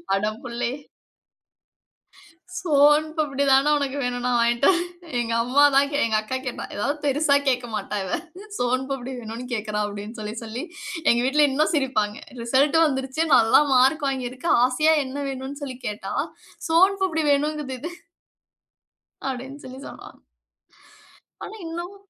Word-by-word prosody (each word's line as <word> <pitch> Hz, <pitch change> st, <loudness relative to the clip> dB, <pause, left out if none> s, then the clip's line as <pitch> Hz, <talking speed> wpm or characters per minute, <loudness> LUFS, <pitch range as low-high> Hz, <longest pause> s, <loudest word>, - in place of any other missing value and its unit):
அட 205 Hz, +2 st, 0 dB, 0.2 s
புள்ளே! 240 Hz, 0 st, -3 dB, 1.9 s
சோன் 295 Hz, -2 st, +4 dB
பப்டி 285 Hz, -2 st, 0 dB
தான 275 Hz, +3 st, +5 dB
உனக்கு 280 Hz, -1 st, -2 dB
வேணும் 245 Hz, 0 st, -2 dB
நான் 250 Hz, -1 st, +2 dB
வாங்கிட்டு 235 Hz, +3 st, +3 dB
வறேன். 350 Hz, -1 st, 0 dB, 0.3 s
எங்க 230 Hz, -1 st, -1 dB
அம்மா 265 Hz, +4 st, +3 dB
தான் 280 Hz, +1 st, +3 dB
எங்க 220 Hz, -1 st, 0 dB
அக்கா 260 Hz, +5 st, -3 dB
கேட்டா. 250 Hz, -, -4 dB
ஏதாவது 280 Hz, +9 st, -1 dB
பெரிசா 285 Hz, +1 st, +3 dB
கேட்க 250 Hz, -2 st, +1 dB
மாட்டா 210 Hz, 0 st, -3 dB
இவ. 185 Hz, -, -2 dB, 0.4 s
சோன் 250 Hz, +1 st, 0 dB
பப்டி 265 Hz, -1 st, -4 dB
வேணும்னு 230 Hz, +2 st, -7 dB
கேட்குறா 210 Hz, -1 st, -2 dB
அப்டின்னு 205 Hz, +3 st, -7 dB
சொல்லி 210 Hz, 0 st, -5 dB
சொல்லி 230 Hz, +5 st, -5 dB, 0.5 s
எங்க 235 Hz, -, +2 dB
வீட்ல 290 Hz, +3 st, +4 dB
இன்னும் 305 Hz, +5 st, +1 dB
சிரிப்பாங்க. 220 Hz, -7 st, 0 dB, 0.2 s
ரிசல்ட் 270 Hz, +6 st, +3 dB
வந்துடுச்சு. 270 Hz, +1 st, -1 dB
நல்ல 230 Hz, +4 st, +5 dB
மார்க் 270 Hz, +4 st, +4 dB
வாங்கி 255 Hz, -2 st, -3 dB
இருக்க. 255 Hz, +6 st, -7 dB, 0.2 s
ஆசையா 305 Hz, +5 st, +3 dB
என்ன 265 Hz, +2 st, -6 dB
வேணும்னு 270 Hz, +2 st, -6 dB
சொல்லி 260 Hz, -3 st, -6 dB
கேட்டா 210 Hz, 0 st, -5 dB, 0.6 s
சோன் 375 Hz, +5 st, +5 dB
பப்டி 320 Hz, -4 st, 0 dB
வேணும்ங்குது 295 Hz, -1 st, -1 dB
இது. 335 Hz, -, -5 dB, 1.4 s
அப்டின்னு 265 Hz, +3 st, -6 dB
சொல்லி 260 Hz, +1 st, -9 dB
சொல்வாங்க. -, -, -12 dB, 1.2 s
ஆனா -, -, -7 dB
இன்னும், 345 Hz, +4 st, -6 dB
265 Hz, 140 wpm, -24 LUFS, 240-295 Hz, 1.9 s, தான